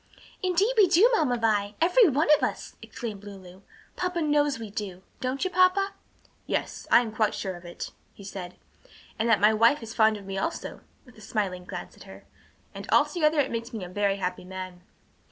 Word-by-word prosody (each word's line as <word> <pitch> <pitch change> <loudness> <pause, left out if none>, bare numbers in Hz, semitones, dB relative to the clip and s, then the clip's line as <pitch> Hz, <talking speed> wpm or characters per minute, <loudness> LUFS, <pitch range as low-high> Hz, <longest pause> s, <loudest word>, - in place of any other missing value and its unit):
"Indeed 375 +6 +2
we 410 -3 +7
do, 400 +9 +5
Mamma 275 - +2
Vi! 210 -3 0
every 365 +5 +5
one 295 +4 +1
of 295 - -5
us!" - - -3
exclaimed 215 -5 -7
Lulu. 190 -2 -12 0.3
"Papa 360 -1 -2
knows 295 -3 +2
we 225 -3 -8
do. 190 -3 -6 0.2
Don't 260 +2 -2
you, 370 - -1
papa?" 370 +2 +3 0.5
"Yes, - - -3
I - - +7
am 230 -3 -5
quite 215 -2 +1
sure 190 -2 -4
of 175 0 -13
it," 175 - -7 0.2
he 200 - -14
said. 185 -2 -7 0.6
"And 230 +2 +1
that 225 - +4
my 210 +2 +5
wife 230 +5 +3
is 225 0 -7
fond 220 -1 +3
of 200 - -12
me 195 0 -4
also," - - -4 0.2
with 245 -4 -17
a - - -14
smiling 195 -4 -3
glance - - -8
at - - -14
her, - - -13 0.5
"and - - -9
altogether 310 -3 +3
it 285 - +1
makes 230 +1 -4
me 215 -4 -5
a 180 - -7
very 200 +1 0
happy 180 -2 -4
man." 185 -1 -8
225 Hz, 200 wpm, -27 LUFS, 195-300 Hz, 0.6 s, we